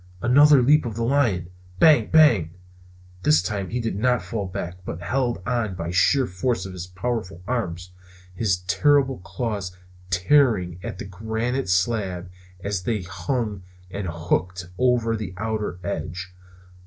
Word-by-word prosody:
Another 140 Hz, +2 st, +6 dB
leap 150 Hz, +4 st, +5 dB
of 110 Hz, -, -5 dB
the 115 Hz, -, -2 dB
lion! 115 Hz, -9 st, +1 dB, 0.3 s
Bang! 150 Hz, -4 st, +5 dB
Bang! 115 Hz, -, +4 dB, 0.7 s
This 80 Hz, 0 st, +4 dB
time 100 Hz, -1 st, -3 dB
he 125 Hz, -, -2 dB
did 115 Hz, -4 st, -2 dB
not 125 Hz, +4 st, +1 dB
fall 105 Hz, -4 st, -4 dB
back, 90 Hz, 0 st, -6 dB
but 85 Hz, -, -6 dB
held 125 Hz, +4 st, 0 dB
on 115 Hz, -6 st, -1 dB
by 85 Hz, -1 st, -4 dB
sheer 130 Hz, +9 st, +3 dB
force 95 Hz, +1 st, -2 dB
of 95 Hz, -, -7 dB
his 90 Hz, -1 st, -6 dB
powerful 95 Hz, -2 st, -4 dB
arms; 90 Hz, -8 st, -3 dB, 0.4 s
his 95 Hz, -2 st, 0 dB
terrible 135 Hz, +9 st, +2 dB
claws 100 Hz, -3 st, -4 dB, 0.3 s
tearing 90 Hz, -, +2 dB
at -, -, -6 dB
the -, -, -6 dB
granite 110 Hz, +5 st, -3 dB
slab 95 Hz, -1 st, 0 dB, 0.3 s
as 100 Hz, -2 st, -2 dB
they 105 Hz, -1 st, -2 dB
hung 105 Hz, +2 st, -3 dB, 0.3 s
and 100 Hz, -1 st, -4 dB
hooked 85 Hz, +2 st, -2 dB
over 125 Hz, -3 st, +2 dB
its 110 Hz, -1 st, -3 dB
outer 110 Hz, -3 st, -3 dB
edge. 90 Hz, +1 st, -5 dB
105 Hz, 145 wpm, -24 LUFS, 90-120 Hz, 0.7 s, Another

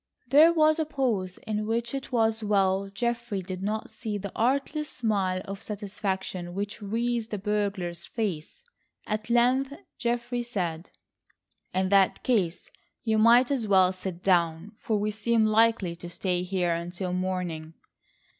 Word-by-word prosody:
There 300 Hz, +6 st, +7 dB
was 310 Hz, -1 st, +4 dB
a 315 Hz, -, +1 dB
pause 230 Hz, -11 st, -1 dB
in 215 Hz, 0 st, -2 dB
which 235 Hz, +2 st, -1 dB
it 275 Hz, 0 st, -5 dB
was 225 Hz, -2 st, +1 dB
well 195 Hz, -1 st, +2 dB
Geoffrey 235 Hz, -2 st, -2 dB
did 185 Hz, 0 st, -6 dB
not 215 Hz, +3 st, -3 dB
see 210 Hz, -2 st, -4 dB
the 200 Hz, -1 st, -6 dB
artless 280 Hz, +5 st, 0 dB
smile 195 Hz, -5 st, -1 dB
of 195 Hz, 0 st, -6 dB
satisfaction 190 Hz, -3 st, -4 dB
which 205 Hz, +2 st, -4 dB
wreathed 230 Hz, +2 st, -1 dB
the 210 Hz, -, -3 dB
burglar's 195 Hz, -4 st, -2 dB
face. 190 Hz, -10 st, -4 dB, 0.4 s
At 215 Hz, +1 st, -3 dB
length 255 Hz, +3 st, +3 dB, 0.3 s
Geoffrey 240 Hz, 0 st, -1 dB
said: 180 Hz, -8 st, -3 dB, 0.8 s
"In 185 Hz, 0 st, 0 dB
that 195 Hz, -1 st, +3 dB
case 190 Hz, -9 st, 0 dB, 0.3 s
you 220 Hz, -2 st, +2 dB
might 240 Hz, +4 st, +6 dB
as 250 Hz, -6 st, 0 dB
well 190 Hz, -2 st, +5 dB
sit 185 Hz, -1 st, -6 dB
down, 170 Hz, 0 st, +2 dB
for 220 Hz, -, 0 dB
we 210 Hz, +1 st, 0 dB
seem 220 Hz, +1 st, +2 dB
likely 215 Hz, -5 st, +3 dB
to 175 Hz, 0 st, -8 dB
stay 180 Hz, 0 st, -1 dB
here 180 Hz, -1 st, 0 dB
until 175 Hz, +2 st, -4 dB
morning." 180 Hz, -4 st, -3 dB
210 Hz, 145 wpm, -27 LUFS, 185-235 Hz, 0.8 s, There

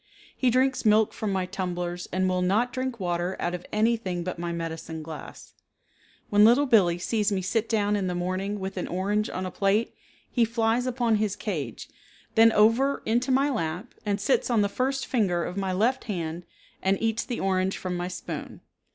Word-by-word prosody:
He 255 Hz, -, +2 dB
drinks 260 Hz, +2 st, +2 dB
milk 215 Hz, -1 st, +4 dB
from 215 Hz, -2 st, -3 dB
my 190 Hz, -1 st, 0 dB
tumblers 180 Hz, -2 st, -4 dB
and 185 Hz, +1 st, +1 dB
will 185 Hz, 0 st, +1 dB
not 215 Hz, +7 st, +1 dB
drink 255 Hz, -2 st, -3 dB
water 175 Hz, 0 st, -1 dB
out 175 Hz, -, -1 dB
of 180 Hz, 0 st, -6 dB
anything 215 Hz, -5 st, 0 dB
but 180 Hz, -1 st, -5 dB
my 170 Hz, 0 st, -3 dB
medicine 165 Hz, -1 st, -5 dB
glass. 155 Hz, 0 st, -9 dB, 0.8 s
When 205 Hz, 0 st, +6 dB
Little 240 Hz, +6 st, +6 dB
Billee 195 Hz, -9 st, +4 dB
sees 210 Hz, +3 st, 0 dB
me 190 Hz, -2 st, -1 dB
sit 220 Hz, +4 st, 0 dB
down 210 Hz, -2 st, +2 dB
in 195 Hz, -2 st, -1 dB
the 180 Hz, -, -2 dB
morning 185 Hz, +3 st, -2 dB
with 190 Hz, 0 st, -5 dB
an 180 Hz, -, -2 dB
orange 205 Hz, +4 st, 0 dB
on 185 Hz, -, -4 dB
a 185 Hz, -, -4 dB
plate, 200 Hz, +4 st, +1 dB, 0.3 s
he 240 Hz, -, +1 dB
flies 230 Hz, +2 st, +1 dB
upon 240 Hz, -3 st, +1 dB
his 210 Hz, -2 st, 0 dB
cage, 150 Hz, -, -4 dB, 0.5 s
then 225 Hz, 0 st, +6 dB
over 230 Hz, +7 st, +3 dB
into 240 Hz, +4 st, +1 dB
my 275 Hz, +2 st, +3 dB
lap, 180 Hz, -1 st, -3 dB
and 205 Hz, -1 st, -1 dB
sits 255 Hz, +7 st, +1 dB
on 235 Hz, -3 st, +3 dB
the 200 Hz, -, 0 dB
first 265 Hz, +4 st, -1 dB
finger 185 Hz, -8 st, +1 dB
of 180 Hz, -, -5 dB
my 195 Hz, -1 st, -1 dB
left 230 Hz, +8 st, +1 dB
hand 170 Hz, -5 st, -4 dB, 0.3 s
and 190 Hz, +1 st, +1 dB
eats 225 Hz, -1 st, 0 dB
the 245 Hz, -, -4 dB
orange 190 Hz, 0 st, 0 dB
from 185 Hz, -1 st, -3 dB
my 175 Hz, 0 st, -2 dB
spoon. 180 Hz, -1 st, -6 dB
200 Hz, 195 wpm, -26 LUFS, 180-230 Hz, 0.8 s, When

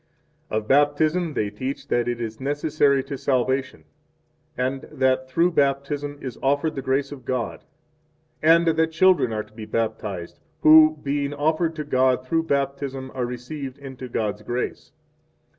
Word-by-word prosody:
1 110 Hz, -, -1 dB
Of 105 Hz, -, -16 dB
Baptism 150 Hz, +4 st, +2 dB
they 105 Hz, -1 st, -1 dB
teach 130 Hz, +6 st, -5 dB
that 120 Hz, 0 st, +1 dB
it 120 Hz, -1 st, -2 dB
is 110 Hz, -2 st, -5 dB
necessary 145 Hz, -1 st, +1 dB
2 135 Hz, -, -20 dB
to 140 Hz, -, -3 dB
salvation, 130 Hz, 0 st, 0 dB, 0.7 s
and 130 Hz, +2 st, -1 dB
that 130 Hz, 0 st, +1 dB
through 170 Hz, +6 st, +2 dB
Baptism 145 Hz, 0 st, 0 dB
is 130 Hz, -3 st, -6 dB
offered 145 Hz, +3 st, +1 dB
the 135 Hz, -, -4 dB
grace 135 Hz, +2 st, 0 dB
of 140 Hz, -3 st, -9 dB
God, 125 Hz, -3 st, -3 dB, 0.8 s
and 165 Hz, +2 st, +5 dB
that 160 Hz, 0 st, +2 dB
children 170 Hz, -6 st, +4 dB
are 110 Hz, -1 st, -2 dB
to 105 Hz, -, -23 dB
be 110 Hz, -1 st, -8 dB
baptized 105 Hz, -6 st, -3 dB, 0.2 s
who, 155 Hz, 0 st, +7 dB
being 140 Hz, 0 st, -1 dB
offered 160 Hz, +3 st, 0 dB
to 155 Hz, -, -4 dB
God 130 Hz, -2 st, +2 dB
through 165 Hz, +4 st, 0 dB
Baptism 140 Hz, -2 st, -2 dB
are 125 Hz, -2 st, -2 dB
received 130 Hz, +2 st, -6 dB
into 135 Hz, -2 st, -9 dB
God's 105 Hz, -2 st, -2 dB
grace. 120 Hz, +4 st, -4 dB
135 Hz, 160 wpm, -24 LUFS, 125-145 Hz, 0.8 s, who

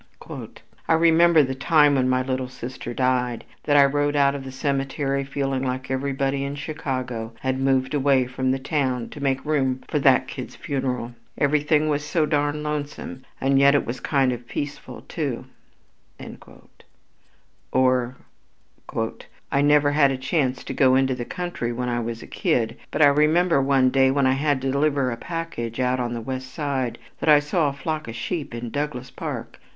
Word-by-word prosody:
"I -, -, +4 dB
remember 165 Hz, 0 st, +5 dB
the 130 Hz, 0 st, -2 dB
time 150 Hz, +2 st, +4 dB
when 130 Hz, -2 st, +2 dB
my 130 Hz, 0 st, +2 dB
little 130 Hz, 0 st, -2 dB
sister 125 Hz, -1 st, -7 dB
died, 125 Hz, -1 st, 0 dB, 0.2 s
that 145 Hz, -1 st, +4 dB
I 140 Hz, -, +8 dB
rode 145 Hz, +1 st, +1 dB
out 140 Hz, -1 st, +4 dB
to 140 Hz, -, -5 dB
the 135 Hz, -1 st, -8 dB
cemetery 135 Hz, 0 st, -1 dB
feeling 135 Hz, -1 st, -2 dB
that 130 Hz, +1 st, -4 dB
everybody 135 Hz, +1 st, -1 dB
in 140 Hz, +1 st, -4 dB
Chicago 130 Hz, -7 st, -4 dB
had 130 Hz, 0 st, -1 dB
moved 135 Hz, 0 st, +1 dB
away 135 Hz, -2 st, +3 dB
from 130 Hz, +1 st, -2 dB
the 130 Hz, -, +2 dB
town 130 Hz, -4 st, -1 dB
to 145 Hz, -, -10 dB
make 135 Hz, 0 st, 0 dB
room 135 Hz, -4 st, 0 dB
for 150 Hz, -, 0 dB
that 135 Hz, -2 st, +4 dB
kid's 130 Hz, -3 st, -7 dB
funeral, 125 Hz, -3 st, -3 dB, 0.2 s
everything 150 Hz, +1 st, +2 dB
was 150 Hz, -1 st, 0 dB
so 155 Hz, +1 st, +1 dB
darned 145 Hz, 0 st, 0 dB
lonesome 145 Hz, -3 st, -5 dB
and 135 Hz, 0 st, +3 dB
yet 140 Hz, +1 st, +6 dB
it 145 Hz, -, +2 dB
was 125 Hz, +2 st, -4 dB
kind 135 Hz, -3 st, +1 dB
of 120 Hz, 0 st, -8 dB
peaceful 145 Hz, +2 st, -6 dB
too." -, -, -3 dB, 2.3 s
Or, 130 Hz, -1 st, +2 dB, 1.3 s
"I 140 Hz, -, +2 dB
never 145 Hz, 0 st, +4 dB
had 145 Hz, -1 st, +4 dB
a 135 Hz, -, -1 dB
chance 130 Hz, -1 st, -1 dB
to -, -, -5 dB
go 130 Hz, -2 st, +4 dB
into 130 Hz, 0 st, +2 dB
the 120 Hz, -1 st, -5 dB
country 175 Hz, -9 st, -4 dB
when 125 Hz, +1 st, -3 dB
I 120 Hz, 0 st, 0 dB
was 115 Hz, 0 st, -4 dB
a -, -, -9 dB
kid, 115 Hz, -1 st, 0 dB
but -, -, +2 dB
I -, -, +9 dB
remember 155 Hz, +2 st, +3 dB
one 135 Hz, -1 st, +3 dB
day 135 Hz, 0 st, +4 dB
when 140 Hz, 0 st, +2 dB
I 130 Hz, -, +4 dB
had 140 Hz, 0 st, 0 dB
to 135 Hz, -, 0 dB
deliver 140 Hz, -2 st, +1 dB
a -, -, -2 dB
package 140 Hz, -6 st, -5 dB
way 130 Hz, -, +1 dB
out 125 Hz, +1 st, +1 dB
on 120 Hz, -1 st, -2 dB
the 115 Hz, -, -4 dB
West 130 Hz, +2 st, -5 dB
Side, 135 Hz, -6 st, -2 dB, 0.2 s
that -, -, 0 dB
I 150 Hz, -, +9 dB
saw 150 Hz, +1 st, +1 dB
a -, -, -5 dB
flock 155 Hz, +2 st, -4 dB
of 115 Hz, -, -6 dB
sheep 140 Hz, +1 st, -4 dB
in 120 Hz, 0 st, -5 dB
Douglas 140 Hz, -3 st, -4 dB
Park. -, -, -6 dB
135 Hz, 185 wpm, -23 LUFS, 130-145 Hz, 2.3 s, I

